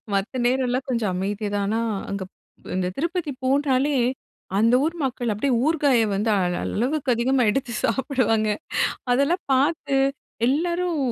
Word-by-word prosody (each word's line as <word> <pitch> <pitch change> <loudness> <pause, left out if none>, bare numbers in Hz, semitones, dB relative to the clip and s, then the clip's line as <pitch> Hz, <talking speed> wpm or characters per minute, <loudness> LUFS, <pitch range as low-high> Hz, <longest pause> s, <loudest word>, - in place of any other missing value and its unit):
மத்த 200 +6 -1
நேரம்லாம் 255 0 0
கொஞ்சம் 225 -6 0
அமைதியா 205 +3 -2
தான், 200 -1 0
ஆனா 220 +2 0 0.3
அங்கப் 195 -2 -4 0.5
இந்த 180 -1 0
திருப்பதி 340 0 -2
போனாலே, 275 +1 +2 0.6
அந்த 230 +3 +4
ஊர் 330 +2 -1
மக்கள் 245 -3 -2
அப்டியே 235 +6 0
ஊருகாய 285 -7 +3
வந்து 210 +3 0 0.3
அளவுக்கு 260 +3 0
அதிகமாக 240 -1 +2
எடுத்து 250 +1 -2
சாப்பிடுவாங்க. 230 -4 +1 0.6
அதெல்லாம் 280 +8 +2
பாத்து 280 0 +2 0.5
எல்லாரும் 340 +4 0
255 Hz, 125 wpm, -23 LUFS, 225-285 Hz, 0.6 s, அந்த